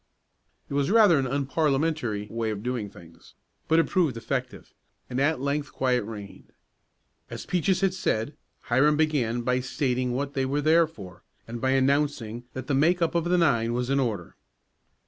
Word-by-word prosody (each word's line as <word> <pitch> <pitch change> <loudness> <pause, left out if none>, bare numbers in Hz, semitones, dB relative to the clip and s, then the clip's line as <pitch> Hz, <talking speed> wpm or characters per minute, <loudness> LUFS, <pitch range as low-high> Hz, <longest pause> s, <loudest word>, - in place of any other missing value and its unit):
It - - -8
was 140 0 +1
rather 205 -8 +6
an 130 - -1
unparliamentary 140 -4 0
way 115 -1 -2
of 105 -1 -4
doing 120 -4 -3
things, 85 -4 -17 0.3
but 160 - +3
it 165 - +4
proved 160 -10 +1
effective, 125 +2 -4 0.4
and 125 - -1
at 145 +1 +2
length 140 +1 -2
quiet 125 -3 +1
reigned. 105 -2 -10 0.8
As - - -7
Peaches 180 +2 0
had 195 -1 +2
said, 140 -7 -1 0.3
Hiram 145 +5 +2
began 135 -7 +1
by 125 +1 +1
stating 125 -1 -1
what 140 +2 -3
they 135 - 0
were 145 +2 0
there 160 +2 +4
for, 95 - -12 0.3
and 115 0 -6
by 130 - +1
announcing 135 -4 0
that 130 -1 -6
the 145 - -2
make 165 +6 +3
up 165 -2 0
of 170 -1 0
the 180 +1 +2
nine 120 -9 +2
was 125 +2 -2
in 140 - +2
order. 110 -9 -3
135 Hz, 175 wpm, -26 LUFS, 120-155 Hz, 0.8 s, rather